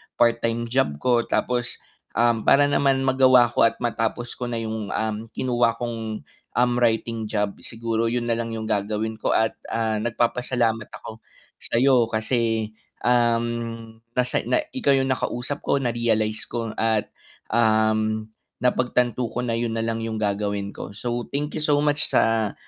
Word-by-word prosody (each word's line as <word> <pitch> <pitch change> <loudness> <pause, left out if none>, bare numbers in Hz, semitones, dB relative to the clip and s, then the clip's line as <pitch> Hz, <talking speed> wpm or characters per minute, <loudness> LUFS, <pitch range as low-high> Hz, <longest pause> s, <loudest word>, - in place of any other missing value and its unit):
part-time 115 0 +2
job 130 - +1
ko 120 +5 +1
tapos, 125 0 0 0.4
um, 115 -1 +3
para 145 +1 +6
naman 135 -2 +2
magawa 130 -2 +5
ko 115 - +5
at - - -3
matapos 120 +1 -1
ko 125 - -2
na 120 -1 -3
yung, 110 -2 -4
um, 110 +1 -2
kinuha 120 -2 +1
kong, 115 -2 -4 0.3
um, 125 0 +3
writing 115 -1 0
job. 105 -2 0
Siguro 115 0 -2
yun 120 +1 -1
nalang 115 0 -2
yung 110 0 -4
gagawin 110 +1 -2
ko - - +1
at, 110 0 +2 0.2
ah, 110 -2 0
nagpapasalamat 120 -1 0 0.2
ako 110 0 -8 0.4
sa'yo 125 -1 +3
kasi, 110 -1 0 0.3
um, 115 -1 0 0.2
nasa 125 0 0
na 315 - +2
ikaw 225 - +3
yung 135 0 +2
nakausap 130 +1 -2
ko 140 - +2
na-realize 115 -3 0
ko 115 -1 -4
at, 110 -1 +1 0.4
um, 110 -1 +2 0.3
napagtanto 125 -1 +1
ko 125 - -2
na 115 -2 -1
yun 115 -1 -1
nalang 115 0 -1
yung 110 -1 -3
gagawin 100 -1 -1
ko. 100 - -7
So, 120 +3 -3
thank 145 +2 -2
you 155 - -3
so 145 -1 +3
much 150 0 +1
sa 110 -2 +2
115 Hz, 150 wpm, -24 LUFS, 110-125 Hz, 0.4 s, para